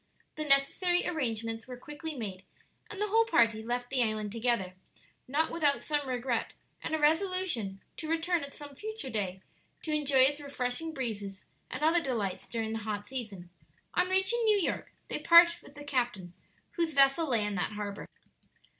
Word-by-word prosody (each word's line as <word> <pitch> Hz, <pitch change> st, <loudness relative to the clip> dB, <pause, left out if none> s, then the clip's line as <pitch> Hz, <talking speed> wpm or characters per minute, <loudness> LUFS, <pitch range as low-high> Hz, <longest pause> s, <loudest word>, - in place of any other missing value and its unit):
The 305 Hz, -, -3 dB
necessary 295 Hz, +6 st, +3 dB
arrangements 230 Hz, -7 st, -2 dB
were 250 Hz, -1 st, -7 dB
quickly 295 Hz, +4 st, -7 dB
made, 195 Hz, -6 st, -5 dB, 0.5 s
and 410 Hz, -, -6 dB
the 420 Hz, 0 st, 0 dB
whole 450 Hz, +2 st, +4 dB
party 230 Hz, -, +3 dB
left 245 Hz, +2 st, -3 dB
the 265 Hz, -2 st, +2 dB
island 215 Hz, -2 st, 0 dB
together, 230 Hz, -5 st, 0 dB, 0.5 s
not 300 Hz, +5 st, +1 dB
without 295 Hz, -4 st, +1 dB
some 295 Hz, -2 st, -1 dB
regret 245 Hz, -2 st, -1 dB, 0.3 s
and 315 Hz, -, -1 dB
a -, -, -1 dB
resolution 315 Hz, -, +1 dB, 0.2 s
to 315 Hz, -, -5 dB
return 330 Hz, 0 st, +1 dB
at 280 Hz, -, -6 dB
some 290 Hz, 0 st, -10 dB
future 430 Hz, -3 st, -6 dB
day 190 Hz, -3 st, -3 dB, 0.4 s
to 310 Hz, -, -2 dB
enjoy 285 Hz, -3 st, +3 dB
its 285 Hz, +3 st, +4 dB
refreshing 280 Hz, +2 st, -3 dB
breezes 205 Hz, -8 st, -4 dB, 0.2 s
and 260 Hz, +4 st, -5 dB
other 330 Hz, +2 st, +4 dB
delights 220 Hz, -, -2 dB
during 225 Hz, -1 st, -3 dB
the 225 Hz, -, -2 dB
hot 210 Hz, -1 st, -4 dB
season. 205 Hz, -9 st, -6 dB, 0.4 s
On 360 Hz, +1 st, +2 dB
reaching 385 Hz, +5 st, +2 dB
New 430 Hz, -2 st, +4 dB
York 380 Hz, -, -2 dB, 0.2 s
they -, -, -3 dB
parted 340 Hz, 0 st, +7 dB
with 285 Hz, -, -16 dB
the 290 Hz, -, -9 dB
captain, 240 Hz, -10 st, -2 dB, 0.4 s
whose 335 Hz, -2 st, -1 dB
vessel 275 Hz, +3 st, +4 dB
lay 225 Hz, -4 st, +2 dB
in 210 Hz, -, -1 dB
that 180 Hz, +1 st, -2 dB
harbor. 205 Hz, -1 st, -5 dB
270 Hz, 170 wpm, -30 LUFS, 220-320 Hz, 0.5 s, parted